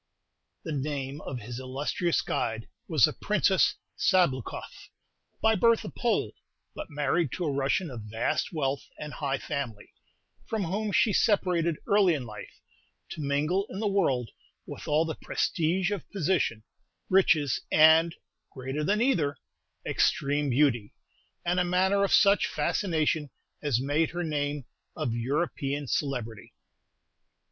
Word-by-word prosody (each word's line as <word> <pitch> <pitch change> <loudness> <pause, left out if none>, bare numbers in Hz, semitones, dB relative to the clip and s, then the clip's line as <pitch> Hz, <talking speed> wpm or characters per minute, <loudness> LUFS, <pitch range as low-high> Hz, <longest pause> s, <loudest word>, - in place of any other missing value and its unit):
The 165 - -5
name 140 0 -3
of 125 -3 -4
his 120 +2 -7
illustrious 140 +6 -1
guide 110 -1 -2 0.2
was - - +5
the - - -2
Princess - - +2 0.2
Sabloukoff, 140 - 0 0.5
by 220 - +5
birth 230 +2 +3
a - - -6
Pole, 235 -2 0 0.4
but - - -7
married 150 0 0
to 180 - -2
a 150 - 0
Russian 140 +4 0
of 120 -3 -7
vast 110 +2 -1
wealth 140 -4 -1
and 150 0 -7
high 140 -2 -1
family, 130 -8 -5 0.6
from 220 -3 -1
whom 205 +5 -2
she 210 +2 +3
separated 175 -7 +2
early 200 -4 +4
in 135 -4 -4
life, 105 -3 -10 0.5
to - - -6
mingle 150 +8 0
in 190 - -6
the 215 - 0
world 135 - +1 0.3
with - - -9
all 155 +2 +3
the 160 - -3
"prestige" 175 +5 0
of 205 -4 -4
position, 165 - 0 0.4
riches, 160 -8 +3
and 160 +2 +6 0.4
greater 135 +3 -4
than 210 +7 +2
either 155 - +1 0.5
extreme 145 +1 +1
beauty, 120 -5 +1 0.5
and 175 +1 +1
a - - +3
manner 190 +3 +2
of 200 - 0
such 200 0 +5
fascination 155 -5 0 0.3
as 140 -6 +1
made 145 +4 +1
her 175 +1 -3
name 145 -3 -2 0.3
of 120 - -2
European 140 +3 -2
celebrity. 125 -6 -3
150 Hz, 135 wpm, -28 LUFS, 135-180 Hz, 0.6 s, and